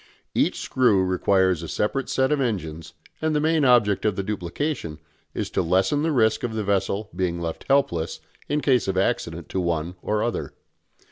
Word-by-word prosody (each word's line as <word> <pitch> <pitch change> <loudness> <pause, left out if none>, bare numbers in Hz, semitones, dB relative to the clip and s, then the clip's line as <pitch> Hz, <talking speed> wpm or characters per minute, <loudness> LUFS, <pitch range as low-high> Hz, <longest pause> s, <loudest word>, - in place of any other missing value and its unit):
Each - - +1
screw 110 -7 +3
requires 95 -1 +2
a 85 - -6
separate 135 - -1
set 130 +1 +1
of 150 -2 +2
engines 80 - -3 0.3
and 155 -1 0
the - - +3
main 160 0 +2
object 120 -6 +4
of 105 -3 +1
the 100 - -2
duplication 100 - -3 0.4
is - - -3
to - - +1
lessen 95 - +2
the 160 +1 +1
risk 110 -5 +2
of 115 -2 -3
the 110 - -1
vessel 100 +1 -1
being 85 -2 -1
left 85 -1 -5
helpless 110 -13 +1 0.3
in 150 +1 +1
case 130 -6 +2
of 95 -1 -1
accident 85 -5 -1
to 95 - -1
one 85 0 -1
or 105 0 0
other. 120 - -3
100 Hz, 185 wpm, -24 LUFS, 90-130 Hz, 0.4 s, object